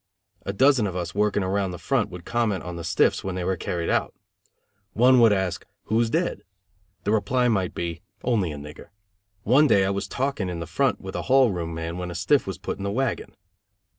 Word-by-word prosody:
A -, -, 0 dB
dozen 130 Hz, +1 st, +4 dB
of 90 Hz, -, -5 dB
us 90 Hz, -2 st, -3 dB
working 105 Hz, -1 st, +1 dB
around 95 Hz, +1 st, 0 dB
the 90 Hz, -, -6 dB
front 135 Hz, -1 st, 0 dB
would 90 Hz, -1 st, -10 dB
comment 115 Hz, -6 st, 0 dB
on 90 Hz, 0 st, -6 dB
the 85 Hz, -, -6 dB
"stiffs" 80 Hz, 0 st, +2 dB
when 95 Hz, -1 st, -3 dB
they 90 Hz, -, -3 dB
were 95 Hz, +2 st, 0 dB
carried 85 Hz, -2 st, -3 dB
out. -, -, 0 dB, 0.8 s
One 125 Hz, +3 st, +5 dB
would 115 Hz, -2 st, +6 dB
ask, 95 Hz, -4 st, -1 dB, 0.2 s
"Who's 115 Hz, +1 st, +1 dB
dead?" 165 Hz, -, -1 dB, 0.6 s
The 105 Hz, -, 0 dB
reply 125 Hz, +3 st, +2 dB
might 95 Hz, -5 st, 0 dB
be, 85 Hz, -1 st, -4 dB, 0.2 s
"Only 105 Hz, -9 st, +1 dB
a 75 Hz, -, -6 dB
nigger." 75 Hz, +1 st, -10 dB, 0.6 s
One 135 Hz, +7 st, +5 dB
day 100 Hz, -7 st, +4 dB
I 95 Hz, -, 0 dB
was 100 Hz, 0 st, -3 dB
talking 130 Hz, -8 st, -2 dB
in 85 Hz, -1 st, -4 dB
the 85 Hz, -, -4 dB
front 115 Hz, +8 st, 0 dB
with 95 Hz, 0 st, -7 dB
a -, -, -2 dB
hall 130 Hz, -3 st, +5 dB
room 85 Hz, -3 st, -4 dB
man 85 Hz, +2 st, -4 dB
when 90 Hz, 0 st, -4 dB
a 85 Hz, -, -7 dB
stiff 115 Hz, -, +2 dB
was 95 Hz, -, -4 dB
put -, -, -5 dB
in -, -, -5 dB
the 100 Hz, -, -1 dB
wagon. 130 Hz, +3 st, -2 dB
100 Hz, 220 wpm, -25 LUFS, 90-120 Hz, 0.8 s, would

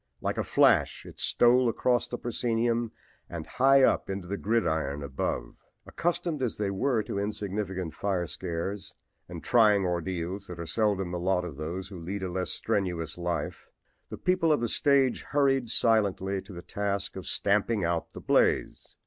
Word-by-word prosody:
Like -, -, -2 dB
a -, -, +1 dB
flash -, -, +3 dB
it -, -, -12 dB
stole 125 Hz, +1 st, +4 dB
across 120 Hz, +1 st, +1 dB
the 120 Hz, -, -4 dB
proscenium 120 Hz, -1 st, -1 dB, 0.4 s
and 85 Hz, -2 st, -6 dB
high 135 Hz, +1 st, +4 dB
up -, -, +2 dB
into 95 Hz, -2 st, -4 dB
the 100 Hz, -, -2 dB
gridiron 80 Hz, -10 st, 0 dB
above. 65 Hz, -3 st, -3 dB, 0.3 s
Accustomed 170 Hz, -3 st, -2 dB
as 125 Hz, -4 st, -1 dB
they 100 Hz, -2 st, -1 dB
were 115 Hz, +3 st, +1 dB
to 100 Hz, -, -4 dB
insignificant 100 Hz, -4 st, -3 dB
fire 95 Hz, -3 st, -1 dB
scares 90 Hz, +4 st, -4 dB, 0.3 s
and -, -, -8 dB
trying 105 Hz, -5 st, +4 dB
ordeals 90 Hz, +2 st, -3 dB
that 90 Hz, -1 st, -8 dB
are 85 Hz, -, -4 dB
seldom 95 Hz, -1 st, 0 dB
the 90 Hz, -, -3 dB
lot 90 Hz, 0 st, +1 dB
of 80 Hz, -5 st, -7 dB
those 90 Hz, +5 st, -5 dB
who 95 Hz, -3 st, -8 dB
lead 95 Hz, +4 st, -5 dB
a 90 Hz, -, -3 dB
less 90 Hz, +1 st, -1 dB
strenuous 85 Hz, -5 st, -1 dB
life, 85 Hz, -3 st, -4 dB, 0.4 s
the -, -, -6 dB
people 180 Hz, -3 st, +2 dB
of 150 Hz, -, +3 dB
the 120 Hz, -, 0 dB
stage 135 Hz, 0 st, +2 dB
hurried 135 Hz, -4 st, +1 dB
silently 100 Hz, -4 st, +2 dB
to 100 Hz, -, -13 dB
the 90 Hz, -2 st, -8 dB
task 100 Hz, -1 st, -2 dB
of 95 Hz, -, -7 dB
stamping 105 Hz, +1 st, +1 dB
out 85 Hz, -1 st, -2 dB
the -, -, -8 dB
blaze. -, -, +1 dB
100 Hz, 170 wpm, -28 LUFS, 90-115 Hz, 0.4 s, stole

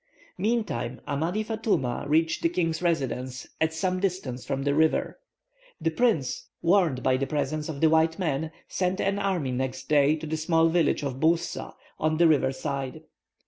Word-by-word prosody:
Meantime, 200 Hz, -, -1 dB
Amadi 165 Hz, +9 st, -1 dB
Fatouma 200 Hz, -, -1 dB
reached 160 Hz, +2 st, +2 dB
the 165 Hz, -, +2 dB
king's 165 Hz, -2 st, -1 dB
residence, 130 Hz, -7 st, -1 dB, 0.2 s
at 160 Hz, 0 st, +3 dB
some 180 Hz, +3 st, -1 dB
distance 180 Hz, -10 st, -2 dB
from 135 Hz, 0 st, -2 dB
the 140 Hz, 0 st, +1 dB
river. 160 Hz, -, +1 dB, 0.6 s
The 165 Hz, -1 st, 0 dB
prince, 165 Hz, -, 0 dB, 0.2 s
warned 170 Hz, -7 st, +3 dB
of 130 Hz, 0 st, +3 dB
the 135 Hz, -, -1 dB
presence 150 Hz, +2 st, -2 dB
of 140 Hz, -3 st, -5 dB
the 160 Hz, -, +6 dB
white 160 Hz, 0 st, +3 dB
men, 160 Hz, -4 st, -1 dB, 0.2 s
sent 185 Hz, 0 st, -1 dB
an 200 Hz, +1 st, 0 dB
army 185 Hz, -10 st, 0 dB
next 130 Hz, +1 st, -3 dB
day 150 Hz, 0 st, +4 dB
to 160 Hz, -, -7 dB
the 160 Hz, +1 st, -2 dB
small 165 Hz, +1 st, +3 dB
village 165 Hz, -2 st, +2 dB
of 135 Hz, -2 st, -3 dB
Boussa, 165 Hz, +2 st, 0 dB, 0.2 s
on 155 Hz, 0 st, +1 dB
the 170 Hz, 0 st, +6 dB
river 145 Hz, -4 st, +3 dB
side. 140 Hz, +2 st, -4 dB
160 Hz, 170 wpm, -27 LUFS, 140-175 Hz, 0.6 s, the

